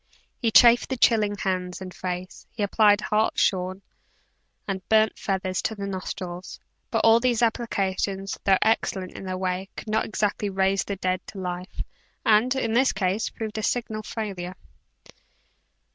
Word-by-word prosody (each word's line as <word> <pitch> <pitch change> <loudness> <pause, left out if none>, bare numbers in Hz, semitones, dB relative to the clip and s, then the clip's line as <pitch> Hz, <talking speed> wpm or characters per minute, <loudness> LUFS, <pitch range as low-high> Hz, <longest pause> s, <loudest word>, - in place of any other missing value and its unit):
He 230 - +2
chafed 235 +2 +6
the 260 - -2
chilling 215 -3 +3
hands 185 -2 -2
and 185 -1 -8
face, 180 0 -6
he 215 - -4
applied 205 0 +4
hartshorn 190 -3 +1 0.8
and 195 -1 -2
burnt 220 0 +3
feathers 190 -1 -1
to 220 - -2
the 200 -1 -5
nostrils, 185 -2 -6 0.3
but - - 0
all 225 +1 +7
these 240 -1 +1
applications, 195 -4 -1
though 195 -1 +4
excellent 190 -4 0
in - - -9
their 185 0 -3
way, 185 +1 -2
could - - -7
not 220 +1 +1
exactly 210 -1 -1
raise 195 0 +1
the 200 - -4
dead 185 -1 -1
to - - -10
life, 180 0 -5 0.4
and, 225 +4 +4
in 230 -4 -1
this 260 +3 +4
case, 195 +2 0
proved 220 -1 -5
a - - -2
signal 220 -1 -1
failure. 195 -5 -5
200 Hz, 155 wpm, -25 LUFS, 185-220 Hz, 0.8 s, all